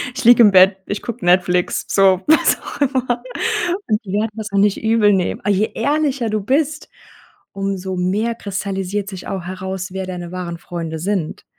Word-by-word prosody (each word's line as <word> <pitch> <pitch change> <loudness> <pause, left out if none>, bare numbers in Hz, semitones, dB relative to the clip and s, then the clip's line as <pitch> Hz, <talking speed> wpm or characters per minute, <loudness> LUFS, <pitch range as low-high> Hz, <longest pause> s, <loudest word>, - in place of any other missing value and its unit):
ich 265 - -4
liege 240 0 +8
im 210 -3 +7
Bett, 190 0 +6
ich 205 - -4
gucke 235 -2 -6
Netflix.“ 180 0 +2
So 190 -2 +3
was 315 - +4
auch - - -9
immer. 255 -3 0 0.6
Und 215 -1 0
die 185 - -7
werden 210 +2 0
das 215 -1 -6
auch 200 - -1
nicht 200 0 +2
übel 220 -2 +4
nehmen. 185 -2 0
A 205 - -1
je 205 +2 +2
ehrlicher 285 -5 0
du 215 -1 -1
bist, 295 +7 -1 0.6
umso 195 -1 -3
mehr 195 +6 0
kristallisiert 195 -1 -4
sich 190 -3 -8
auch 190 -3 -4
heraus, 185 +1 -5
wer 190 0 -5
deine 175 -2 -6
wahren 180 -2 -5
Freunde 165 -2 -6
sind. 185 -2 -3
195 Hz, 180 wpm, -19 LUFS, 185-225 Hz, 0.6 s, liege